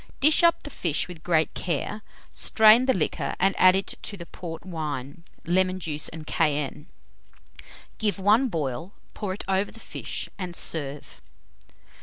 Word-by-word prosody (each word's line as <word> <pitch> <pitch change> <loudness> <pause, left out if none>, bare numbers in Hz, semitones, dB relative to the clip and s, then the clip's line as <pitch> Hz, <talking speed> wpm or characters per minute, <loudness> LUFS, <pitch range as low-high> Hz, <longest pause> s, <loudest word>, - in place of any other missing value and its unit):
Dish 305 +5 +5
up 340 0 +4
the 290 - -8
fish 165 - -1
with 175 -3 -10
great 160 -2 +1
care, 185 +5 -3 0.3
strain 220 +3 +5
the 260 - +4
liquor, 160 -5 -1
and 195 +2 +3
add 185 0 +7
to 205 - -6
it - - -13
the 170 - -8
port 170 -1 -8
wine, 155 -3 -5 0.2
lemon 185 +2 +1
juice, 155 -4 0
and 160 -1 -9
cayenne; 150 -1 -1 1.1
give 210 -5 0
one 210 +7 +4
boil, 160 - -4 0.2
pour 205 -3 -4
it - - -8
over 195 +1 +1
the 225 - -13
fish, - - -5
and 180 -2 -5
serve. 145 -4 -2
180 Hz, 155 wpm, -26 LUFS, 155-205 Hz, 1.1 s, add